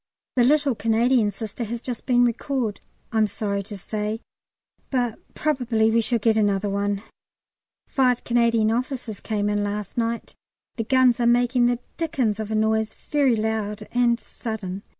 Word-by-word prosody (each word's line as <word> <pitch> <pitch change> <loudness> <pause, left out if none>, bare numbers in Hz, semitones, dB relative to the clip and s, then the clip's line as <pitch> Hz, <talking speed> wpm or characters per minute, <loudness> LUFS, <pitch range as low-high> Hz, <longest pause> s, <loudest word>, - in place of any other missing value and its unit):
The 245 - +4
little 285 +1 +3
Canadian 225 +1 +2
Sister 215 +3 -5
has 235 +2 -4
just 245 -1 -6
been 245 -1 +5
recalled, 240 -2 -1 0.3
I'm 220 -2 +3
sorry 200 -1 -2
to 200 +1 -8
say, 210 +3 -3 0.7
but 245 -4 -1 0.2
probably 245 -7 +1
we 230 +1 +3
shall 235 +1 +1
get 225 0 +2
another 205 -1 +1
one. 200 0 -1 0.8
Five 250 -3 +2
Canadian 235 -2 +3
officers 245 -3 -3
came 210 -2 -1
in 205 0 +1
last 205 +2 -3
night. 230 0 -2 0.4
The 225 - -2
guns 255 -1 +4
are 235 - +3
making 245 +1 +3
the 245 0 +1 0.2
dickens 255 -10 0
of 215 -1 -4
a 220 - -1
noise, 220 0 +1 0.2
very 280 -5 +4
loud 215 -1 -2
and 240 -1 +2
sudden. 200 -6 -6
225 Hz, 155 wpm, -24 LUFS, 210-245 Hz, 0.8 s, been